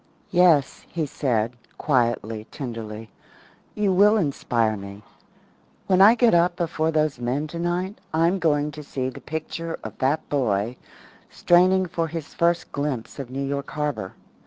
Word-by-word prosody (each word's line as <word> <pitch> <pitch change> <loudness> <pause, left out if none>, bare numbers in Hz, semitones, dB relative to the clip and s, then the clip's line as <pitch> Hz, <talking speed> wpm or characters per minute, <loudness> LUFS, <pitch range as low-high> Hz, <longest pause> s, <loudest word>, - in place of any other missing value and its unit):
"Yes," 175 -6 +3
he 165 -3 -2
said, 125 -5 -1 0.2
quietly, 115 -5 0
tenderly, 115 -5 -7 0.6
"you 205 -2 +1
will 205 +4 +5
inspire 120 - 0
me. 100 +1 -9 0.8
When 185 0 +3
I 215 +4 +8
get 240 -1 +4
up 175 +1 +3
before 165 -2 -1
those 155 -4 0
men 125 +5 -1
tonight 175 +5 -3
I'm 165 +4 +2
going 150 -3 +1
to 150 +1 -9
see 130 -3 -3
the 130 - -10
picture 160 +1 -5
of - - -7
that 140 +4 0
boy 120 -4 0 0.5
straining 185 +2 +4
for 170 -2 -2
his 160 -1 -7
first 170 0 +1
glimpse 140 -4 -3
of 135 -3 -6
New 135 +2 -3
York 140 0 -3
Harbour. 150 -10 -3
150 Hz, 145 wpm, -24 LUFS, 125-170 Hz, 0.8 s, I